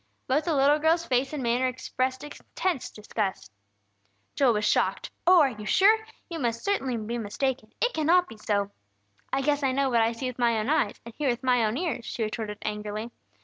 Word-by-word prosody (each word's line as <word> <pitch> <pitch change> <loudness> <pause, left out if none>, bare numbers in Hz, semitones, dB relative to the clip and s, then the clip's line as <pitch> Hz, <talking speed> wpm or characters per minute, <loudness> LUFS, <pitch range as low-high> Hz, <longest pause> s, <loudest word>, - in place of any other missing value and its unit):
Both 295 +4 +1
the 330 - +1
little 285 +2 +4
girl's 325 +2 +2
face 260 0 +1
and 295 -4 -4
manner 240 +2 +2
expressed 255 +1 -2
intense 295 +1 -3
disgust. 210 - -4 0.8
Joel 265 -4 +3
was 210 0 0
shocked. - - +1 0.2
"Oh, 360 -1 +8
are 275 -3 +3
you 210 -2 -8
sure?" 410 +3 +6 0.3
he 335 - -5
cried. 295 - -4
"You 235 - +2
certainly 260 - -1
must 215 -1 -6
be 235 +1 -2
mistaken! 230 +2 -2
It 485 +1 +1
cannot 345 +3 +3
be 225 - -11
so!" 205 -2 -1 0.6
"I 270 0 0
guess 290 +1 +1
I 265 -2 +1
know 275 0 +1
what 235 -1 +4
I 225 +1 +2
see 230 +3 -6
with 255 -1 -4
my 235 -2 +3
own 215 +4 -1
eyes, 260 -9 +1
and 235 - -9
hear 290 -3 +1
with 240 +1 -2
my 250 -2 +3
own 220 +2 0
ears!" 325 -7 -2
she 230 - -3
retorted, 215 -1 -4
angrily. 210 +2 -4
255 Hz, 215 wpm, -27 LUFS, 225-295 Hz, 0.8 s, Oh